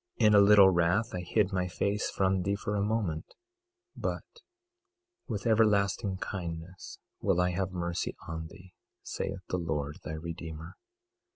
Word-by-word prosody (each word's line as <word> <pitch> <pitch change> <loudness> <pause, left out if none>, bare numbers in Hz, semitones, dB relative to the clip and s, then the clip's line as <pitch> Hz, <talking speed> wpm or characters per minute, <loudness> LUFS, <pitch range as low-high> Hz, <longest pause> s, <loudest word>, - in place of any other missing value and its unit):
22:8 110 - +6
In 105 - +5
a 105 - +8
little 100 -1 +8
wrath 90 +6 +1
I 90 - -2
hid 100 +3 +1
my 90 -1 0
face 100 +3 -1
from 95 -1 +1
thee 100 +3 0
for 105 +1 -3
a 100 - +1
moment, 100 -7 -2 0.6
but - - -3 1.0
with 105 -2 -4
everlasting 105 -3 +2
kindness 90 -1 -6 0.2
will 85 - +1
I 90 0 +2
have 95 +1 -2
mercy 85 -1 -3
on 80 -1 -5
thee, 95 +1 -15 0.3
saith 95 -2 -4
the 90 - -1
Lord 75 -3 -3
thy 80 - -5
Redeemer. 80 0 -7
95 Hz, 155 wpm, -30 LUFS, 85-100 Hz, 1.0 s, a